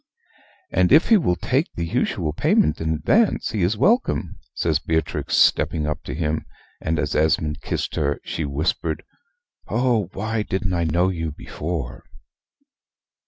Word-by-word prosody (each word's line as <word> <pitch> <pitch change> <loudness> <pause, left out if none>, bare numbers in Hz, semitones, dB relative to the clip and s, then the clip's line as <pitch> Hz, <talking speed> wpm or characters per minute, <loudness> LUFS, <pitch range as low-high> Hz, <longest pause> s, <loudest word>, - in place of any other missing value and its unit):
"And 90 0 +2
if 155 +6 +6
he 225 - +7
will 90 - +1
take 135 - 0
the 85 - -2
usual 80 -2 -1
payment 75 0 +2
in 80 0 0
advance, 90 - +2
he 110 - -2
is 95 +5 +1
welcome," 225 - +1 0.2
says - - +1
Beatrix, 80 0 -1
stepping 80 -1 +3
up 75 0 -2
to - - -5
him; 80 -1 -2 0.3
and, 80 +1 -1
as - - -1
Esmond 75 0 +1
kissed - - -3
her, 70 -1 0
she 80 - -3
whispered, 75 +3 -2 0.6
"Oh, 115 -6 +1
why 110 +2 -2
didn't 95 -2 -2
I 85 -1 0
know 85 +4 +2
you 80 -4 -3
before?" 75 -3 -5
85 Hz, 150 wpm, -22 LUFS, 75-105 Hz, 0.6 s, he